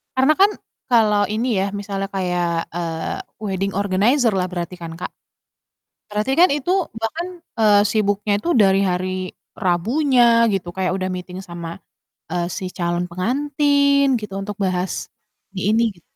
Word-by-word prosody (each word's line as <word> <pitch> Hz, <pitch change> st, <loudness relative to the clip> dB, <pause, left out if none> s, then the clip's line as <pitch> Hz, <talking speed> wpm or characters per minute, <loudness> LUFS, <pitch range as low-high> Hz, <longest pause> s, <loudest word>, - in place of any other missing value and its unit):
Karena 265 Hz, +4 st, +4 dB
kan 410 Hz, +1 st, +6 dB, 0.4 s
kalau 210 Hz, -4 st, +4 dB
ini 230 Hz, +4 st, 0 dB
ya 195 Hz, -, +1 dB
misalnya 195 Hz, -1 st, -3 dB
kayak, 180 Hz, -2 st, 0 dB, 0.3 s
eee, 165 Hz, -1 st, -3 dB, 0.2 s
wedding 195 Hz, -1 st, -2 dB
organizer 220 Hz, +6 st, +2 dB
lah 180 Hz, 0 st, 0 dB
berarti 175 Hz, 0 st, -4 dB
kan 165 Hz, -1 st, -6 dB
Kak? -, -, -5 dB, 1.0 s
Berarti 210 Hz, +5 st, -1 dB
kan 360 Hz, -, +8 dB
itu 295 Hz, +4 st, -3 dB, 0.3 s
bahkan, 235 Hz, +11 st, -2 dB, 0.3 s
eee, 210 Hz, -2 st, +6 dB
sibuknya 205 Hz, -1 st, +1 dB
itu -, -, -4 dB
dari 195 Hz, 0 st, +4 dB
hari 185 Hz, +1 st, -2 dB, 0.6 s
Rabunya 240 Hz, -, +2 dB, 0.3 s
gitu 185 Hz, -3 st, -2 dB
kayak 185 Hz, -1 st, 0 dB
udah 185 Hz, -1 st, -2 dB
meeting 180 Hz, 0 st, -6 dB
sama, 170 Hz, -1 st, -6 dB, 0.6 s
eee, 175 Hz, 0 st, -1 dB
si -, -, -6 dB
calon 175 Hz, 0 st, -1 dB
pengantin 280 Hz, +7 st, +2 dB, 0.2 s
gitu 210 Hz, -2 st, -7 dB
untuk 205 Hz, 0 st, -5 dB
bahas 185 Hz, 0 st, -2 dB, 0.5 s
ini -, -, -2 dB
ini 230 Hz, -, +3 dB
gitu. 175 Hz, -, -21 dB
195 Hz, 145 wpm, -21 LUFS, 180-235 Hz, 1.0 s, kan